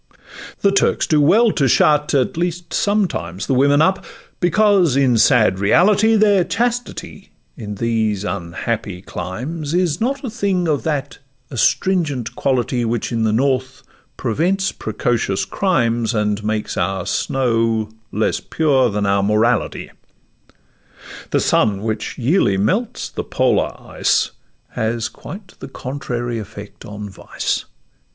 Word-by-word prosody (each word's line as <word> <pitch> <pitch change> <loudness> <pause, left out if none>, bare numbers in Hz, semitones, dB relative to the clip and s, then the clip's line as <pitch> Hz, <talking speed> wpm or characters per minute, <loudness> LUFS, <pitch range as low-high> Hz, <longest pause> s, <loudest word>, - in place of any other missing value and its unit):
The 200 - +4
Turks 195 - +2
do 155 -2 +3
well 215 +10 +5
to 140 -7 +1
shut—at 150 0 +3
least, 175 0 -3
sometimes— 175 - -1
The - - 0
women 140 +3 +4
up, 190 +2 +1 0.4
because, 185 -4 +3
in 130 -4 +3
sad 105 -7 +4
reality, 205 - +4
Their 205 -3 +4
chastity 235 -5 -3 0.3
in 105 -5 -6
these 110 -2 0
unhappy 95 +1 -4
climes 140 - -5
Is 175 -2 0
not 270 +4 -1
a 255 - -3
thing 195 -6 0
of 150 -3 +1
that 145 -3 -2 0.3
astringent 145 - 0
quality 125 -2 0
Which 115 +2 -2
in 115 -1 0
the 110 - +2
North 130 +2 0 0.3
prevents 180 - 0
precocious 120 -7 -1
crimes, 120 - 0
And 105 -1 0
makes 110 0 -2
our 95 0 -1
snow 115 -4 0 0.2
less 110 +2 0
pure 135 -6 +2
than 105 -1 -1
our 100 0 +2
morality; 105 +4 0 1.4
The - - +1
sun, 100 -1 +1
which 110 -1 -3
yearly 125 - +2
melts 195 - -1
the - - -5
polar - - 0
ice, - - 0 0.4
Has 110 +1 -2
quite 195 -1 -10
the 135 - -8
contrary 120 -3 -4
effect 105 0 -10
on 105 0 -7
vice. 95 - -3
130 Hz, 130 wpm, -19 LUFS, 110-175 Hz, 1.4 s, well